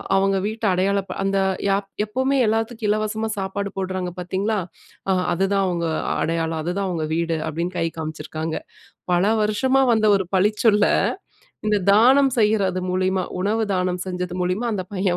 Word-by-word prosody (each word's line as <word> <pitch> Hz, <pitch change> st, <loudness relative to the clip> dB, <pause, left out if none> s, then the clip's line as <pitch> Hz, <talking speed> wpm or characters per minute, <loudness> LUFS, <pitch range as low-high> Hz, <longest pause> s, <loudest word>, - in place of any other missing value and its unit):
அவங்க 195 Hz, 0 st, +2 dB
வீட்ட 220 Hz, +1 st, -6 dB
அடையாள 195 Hz, +2 st, +1 dB
ப -, -, -3 dB
அந்த 195 Hz, 0 st, +1 dB, 0.3 s
யாப் 195 Hz, 0 st, 0 dB, 0.2 s
"எப்பவுமே 260 Hz, +5 st, 0 dB
எல்லாத்துக்கும் 225 Hz, 0 st, -1 dB
இலவசமா 215 Hz, +1 st, 0 dB
சாப்பாடு 195 Hz, +1 st, -3 dB
போடுறாங்க 185 Hz, -1 st, -2 dB
பாத்தீங்களா? 190 Hz, +4 st, -1 dB, 0.5 s
அ -, -, +4 dB, 0.2 s
அதுதான் 195 Hz, +2 st, +1 dB
அவங்க 170 Hz, -2 st, -1 dB, 0.4 s
அடையாளம். 165 Hz, 0 st, -1 dB
அதுதான் 185 Hz, +4 st, -2 dB
அவங்க 165 Hz, -3 st, -2 dB
வீடு" 165 Hz, -1 st, 0 dB
அப்டின்னு 170 Hz, +4 st, -3 dB
கை 165 Hz, -, +1 dB
காமிச்சிருக்காங்க. 155 Hz, 0 st, -4 dB, 0.6 s
பல 175 Hz, 0 st, +3 dB, 0.2 s
வருஷமா 260 Hz, +6 st, +2 dB
வந்த 215 Hz, -1 st, +3 dB
ஒரு 190 Hz, -2 st, -2 dB
பழிச்சொல்ல 210 Hz, +2 st, +3 dB, 0.8 s
இந்த 210 Hz, -1 st, +3 dB
தானம் 260 Hz, +6 st, +5 dB
செய்றது 205 Hz, -4 st, +2 dB
மூலியமா, 185 Hz, +1 st, +1 dB, 0.2 s
உணவு 215 Hz, +4 st, +1 dB
தானம் 180 Hz, 0 st, -1 dB
செஞ்சது 180 Hz, -1 st, -4 dB
மூலியமா 180 Hz, +7 st, -1 dB
அந்த 190 Hz, -3 st, -2 dB
பையன் 185 Hz, -2 st, +1 dB
195 Hz, 145 wpm, -22 LUFS, 180-215 Hz, 0.8 s, தானம்